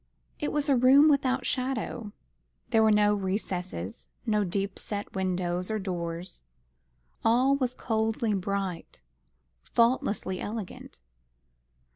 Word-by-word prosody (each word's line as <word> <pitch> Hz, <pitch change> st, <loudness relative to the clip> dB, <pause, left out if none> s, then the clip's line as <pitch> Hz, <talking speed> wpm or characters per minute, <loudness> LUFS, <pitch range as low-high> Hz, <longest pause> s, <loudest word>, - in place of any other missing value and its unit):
It 295 Hz, -, -1 dB
was 295 Hz, 0 st, -1 dB
a 280 Hz, -, +4 dB
room 265 Hz, +5 st, +7 dB
without 265 Hz, -3 st, +2 dB
shadow. 250 Hz, -4 st, -2 dB, 0.6 s
There 225 Hz, -2 st, +5 dB
were 220 Hz, 0 st, +5 dB
no 210 Hz, 0 st, +4 dB
recesses, 185 Hz, -, -3 dB, 0.2 s
no 210 Hz, -2 st, +2 dB
deep 195 Hz, +1 st, -2 dB
set 205 Hz, -1 st, -5 dB
windows 185 Hz, -1 st, -1 dB
or 220 Hz, -, 0 dB
doors. 175 Hz, -2 st, -5 dB, 0.8 s
All 255 Hz, +5 st, +4 dB
was 255 Hz, -3 st, -1 dB
coldly 220 Hz, -1 st, 0 dB
bright, 195 Hz, -2 st, -3 dB, 0.6 s
faultlessly 220 Hz, -, +1 dB
elegant. 210 Hz, -, -7 dB
210 Hz, 110 wpm, -28 LUFS, 185-245 Hz, 0.8 s, room